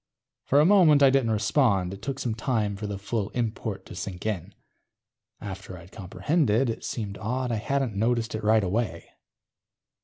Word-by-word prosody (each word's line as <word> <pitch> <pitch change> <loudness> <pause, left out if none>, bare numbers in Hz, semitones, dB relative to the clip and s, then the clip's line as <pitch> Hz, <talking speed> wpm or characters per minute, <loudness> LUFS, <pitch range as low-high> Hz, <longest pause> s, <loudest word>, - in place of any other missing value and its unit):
For 140 - +4
a 150 - +5
moment 170 -7 +6
I 135 - +7
didn't 135 -4 +2
respond. 105 -4 +2
It 100 - -9
took 135 -1 -4
some 120 -4 -2
time 110 -3 -1
for 105 +2 -5
the 100 -1 -4
full 100 +1 -3
import 110 -3 -3
to - - -10
sink 90 0 -6
in. 105 -6 -3 0.8
After 95 -2 -7
I'd 85 +2 -14
comprehended, 115 - 0
it - - -7
seemed 100 -4 -4
odd 125 +4 -2
I 115 - 0
hadn't 135 +1 -1
noticed 115 +2 0
it 110 0 -4
right 110 0 +4
away. 95 -2 -2
110 Hz, 175 wpm, -26 LUFS, 100-125 Hz, 0.8 s, I